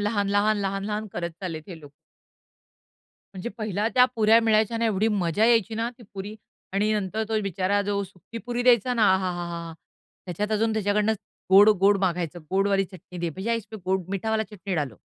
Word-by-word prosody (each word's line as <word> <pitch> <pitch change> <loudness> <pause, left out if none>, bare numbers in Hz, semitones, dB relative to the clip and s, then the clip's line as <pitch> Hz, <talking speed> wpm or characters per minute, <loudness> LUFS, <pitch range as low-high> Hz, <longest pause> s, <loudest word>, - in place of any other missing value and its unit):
लहान-लहान-लहान-लहान 205 0 0
करत 170 0 -3
चाललेत 165 -5 -5
हे 170 -4 -9
लोक. 145 -2 -14 1.4
म्हणजे 190 +4 -5
पहिला 215 0 -1
त्या 250 -1 +7
पुऱ्या 220 +1 +5
मिळायच्या 220 0 +2
ना 230 - 0
एवढी 215 -1 +2
मजा 200 -1 +1
यायची 225 -2 +3
ना, 225 +1 -1
ती - - -14
पुरी 200 +2 -6 0.4
आणि 210 +2 +1
नंतर 210 +1 -1
तो 220 -1 0
बिचारा 195 +1 0
जो 200 0 -1
सुखी 195 +4 -11
पुरी 245 0 -1
द्यायचा 245 0 +4
ना 230 - +1
आहाहाहा! 175 -3 -3 0.5
त्याच्यात 205 +5 -3
अजून 220 +1 +1
त्याच्याकडनं 210 0 +1 0.4
गोड-गोड 200 0 +6
मागायचं. 175 -3 -1
गोडवाली 195 +1 +2
चटणी 180 -1 -12
दे, 170 -1 -2
भैय्या 195 +8 -2
इसमे 220 -1 -6
गोड, 190 0 0
मीठा 195 +3 -2
वाला 220 0 +1
चटणी 195 -2 -5
डालो. 145 -9 -2
205 Hz, 165 wpm, -25 LUFS, 185-220 Hz, 1.4 s, त्या